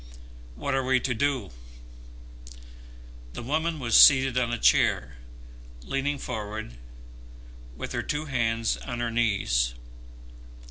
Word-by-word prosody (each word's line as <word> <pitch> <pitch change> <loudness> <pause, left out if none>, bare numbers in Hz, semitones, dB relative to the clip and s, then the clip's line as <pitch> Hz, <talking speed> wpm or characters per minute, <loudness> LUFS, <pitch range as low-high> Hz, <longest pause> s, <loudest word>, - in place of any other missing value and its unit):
What 100 - -3
are 135 0 0
we 130 0 +2
to 125 - -2
do?" 125 - -1 1.8
The - - -7
woman 160 +5 -1
was 120 -5 -1
seated 135 -2 +7
on 125 -2 0
a 120 - -1
chair, 65 - +2 0.7
leaning 135 - -2
forward 110 - -6 1.0
with - - -6
her - - -2
two 150 +1 -3
hands 115 -5 -1
on 120 -1 -6
her 120 -1 -2
knees. 95 - 0
120 Hz, 120 wpm, -26 LUFS, 110-135 Hz, 1.8 s, seated